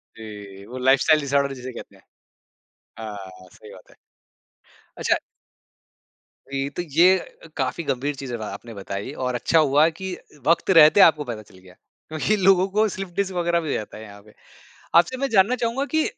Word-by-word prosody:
जी, 100 -3 -11
वो 125 - -8
lifestyle 135 +4 +4
disorder 140 0 0
जिसे 130 0 -8
कहते - - -11
हैं। - - -22 1.0
हाँ, 95 -4 -9
सही - - -14
बात - - -16
है। - - -21 1.0
अच्छा। - - +1 1.3
वी 135 0 -2
तो - - -2 0.2
ये 185 +2 +6
अ, 165 - -14
काफ़ी 135 +5 -2
गंभीर 140 +1 -2
चीज़ 130 -2 -7
अब 115 - -5
आपने 110 +2 -8
बताई 100 +4 -6
और 125 -1 -1
अच्छा 160 +6 +2
हुआ 150 +1 +4
कि 190 -1 -4 0.3
वक़्त 170 +3 +2
रहते 155 +6 +7
आपको 155 -2 0
पता 110 -1 -7
चल 95 - -19
गया, 90 0 -17 0.4
क्योंकि 160 +7 0
लोगों 190 0 +5
को 215 +1 +3
स्लिप 190 -1 -6
डिस्क 195 -1 -1
वग़ैरह 170 -1 +1
भी 160 - -6
हो - - 0
जाता 105 0 -5
है 110 - -10
यहाँ 100 -1 -13
पे। 105 - -20 0.6
आपसे 175 +10 +4
मैं 275 +1 -2
जानना 210 +4 +3
चाहूँगा 250 +5 -1
कि 315 - +3
140 Hz, 180 wpm, -23 LUFS, 110-175 Hz, 1.3 s, रहते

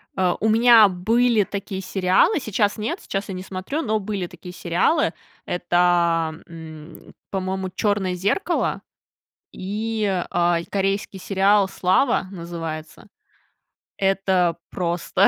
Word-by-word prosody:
А 185 -2 +1
у 220 - +1
меня 225 -1 +7
были 225 +4 +2
такие 195 -1 -5
сериалы. 190 - +2
Сейчас 210 -3 0
нет, 215 +2 -3
сейчас 195 +1 -4
я - - -3
не 185 - -5
смотрю, 190 - -4
но 220 -4 0
были 195 -3 -3
такие 180 +1 -11
сериалы, 180 - +1 0.3
это, 175 0 -3
а, 170 -2 +3
м, 160 -1 -11 0.2
по-моему, 190 0 -2
"Черное 200 -3 0
зеркало" 205 - -1 0.7
и, 215 +3 -3 0.2
а, 175 -1 +2
корейский 195 0 -1
сериал 195 +1 +3
"Слава" 190 +2 +1
называется. 165 -2 -7 0.9
Это 190 -3 +1
просто, 175 -1 +1
190 Hz, 120 wpm, -22 LUFS, 175-210 Hz, 0.9 s, меня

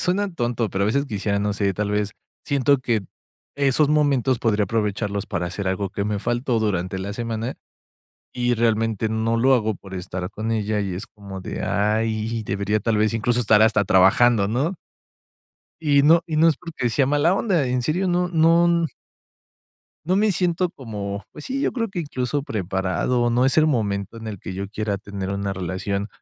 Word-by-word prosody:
suena 200 +3 +1
tonto, 120 -3 -1
pero 95 +1 -2
a - - +1
veces, 140 +6 +1
quisiera, 100 -3 -1
no 105 0 0
sé, 100 -1 0
tal 105 +2 -2
vez, 105 0 0 0.3
siento 140 -1 +2
que 120 -4 0 0.5
esos 140 +1 +2
momentos 140 -4 +2
podría 105 -3 +2
aprovecharlos 105 -1 -2
para 90 0 -2
hacer 95 +2 -3
algo 95 +1 -1
que 100 - -3
me 105 -1 -1
faltó 120 +2 0
durante 95 -4 -1
la 100 +2 -4
semana, 115 +2 -3 0.8
y 125 -1 +1
realmente 115 -1 +1
no 110 +1 0
lo 130 +3 +4
hago 110 -3 +1
por 95 0 -14
estar 90 0 -5
con 110 +1 -3
ella, 105 -1 0
y 95 -3 -2
es 95 +4 -6
como 100 -2 -9
de: - - -5
"Ay, 110 +2 0
debería, 100 +1 0
tal 110 +1 0
vez, 110 +1 +2
incluso, 120 +2 +1
estar 105 -2 +4
hasta 110 -2 +4
trabajando", 100 +4 +4
¿no? 135 - 0 1.1
Y 145 -3 +3
no 165 +3 +6
y 155 - -2
no 165 +2 +5
es 155 - +2
porque 165 -8 -3
sea 130 +3 +2
mala 150 +6 +3
onda, 185 - +1
en 125 0 0
serio, 175 +9 0
no 180 0 +1
no 170 0 +4 1.2
no 185 - +2
me 210 +1 +3
siento 180 0 +1
como, 105 - -6
pues, 150 - -9
sí, 275 +2 -2
yo - - +1
creo 230 -3 -2
que, 190 -3 -4
incluso, 140 -2 -2
preparado, 95 - -1
o 120 - +2
no 125 +2 +3
es 135 - +1
el 155 - +5
momento 105 -5 -1
en 115 - -9
el 105 -3 -5
que 95 - -7
yo 95 +1 -5
quiera 105 -1 -2
tener 100 -1 -5
una 100 0 -2
relación, 95 +3 -3
115 Hz, 190 wpm, -23 LUFS, 100-140 Hz, 1.2 s, no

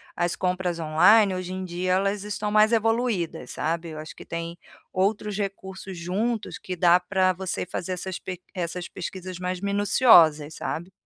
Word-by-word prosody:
as 175 0 0
compras 180 -1 -1
online, 185 +6 +5
hoje 185 0 -4
em 185 0 -4
dia, 180 +1 -1
elas 195 +2 0
estão 210 0 -3
mais 215 +2 +5
evoluídas, 225 - 0
sabe, 165 +2 -2
eu 155 - -8
acho 155 0 -8
que - - -12
tem 170 0 -5 0.4
outros 200 +1 0
recursos 190 -2 -5
juntos 210 +6 -2
que 185 - -5
dá 175 0 +5
para 185 +1 +1
você 185 0 -3
fazer 180 +1 -4
essas 185 +1 -4
pe 180 -1 -7
essas 175 -1 -4
pesquisas 185 0 -7
mais 180 0 -3
minuciosas, 195 - +4
sabe? 170 +4 -4
185 Hz, 165 wpm, -25 LUFS, 175-200 Hz, 0.4 s, online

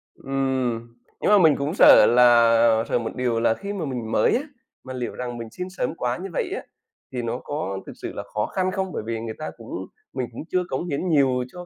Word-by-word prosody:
Ừm, 130 -4 -2 0.3
nhưng - - +2
mà 205 - +8
mình 160 -6 +5
cũng 140 +4 -2
sợ 150 - +8
là 115 -2 +5
sợ - - +2
một 115 - -5
điều 120 -2 0
là 115 -1 +3
khi 200 - -6
mà 185 -6 -3
mình 120 -5 -4
mới - - +3
á, 250 - +1 0.4
mà 130 0 -7
liệu 125 -1 -4
rằng 120 -1 -5
mình 115 - -6
xin 180 +7 -6
sớm 185 -3 -3
quá 125 -3 -2
như 190 +1 -6
vậy - - -2
á, - - -4 0.5
thì 125 -2 -3
nó 115 +1 -3
có 145 -10 -3
thực - - -9
sự - - -7
là - - -5
khó 105 0 0
khăn 185 0 -1
không? 190 -1 -2
Bởi - - -3
vì 115 0 -3
người 110 -1 -5
ta 155 - -5
cũng - - -12 0.4
mình 125 - -2
cũng 115 - -7
chưa 185 0 +1
cống 135 +7 -2
hiến 160 +5 -2
nhiều 135 -5 +3
cho 180 0 -9
125 Hz, 240 wpm, -24 LUFS, 115-160 Hz, 0.5 s, mà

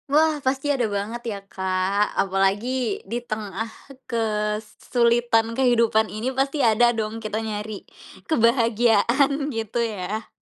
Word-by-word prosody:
Wah, 305 +1 +3
pasti 270 +2 0
ada 250 -4 0
banget 205 +4 -3
ya, 205 - -3
Kak. 190 +2 -1
Apalagi 200 +5 0
di 225 +5 -3
tengah 215 -2 -4 0.4
kesulitan 225 +1 0
kehidupan 230 -3 +3
ini 235 +5 -3
pasti 275 +3 0
ada 230 +2 +5
dong 220 +1 -3
kita 215 -1 -3
nyari 210 -1 -5 0.4
kebahagiaan 240 +3 +2
gitu 225 0 -3
ya. 215 0 -4
225 Hz, 115 wpm, -23 LUFS, 210-245 Hz, 0.4 s, ada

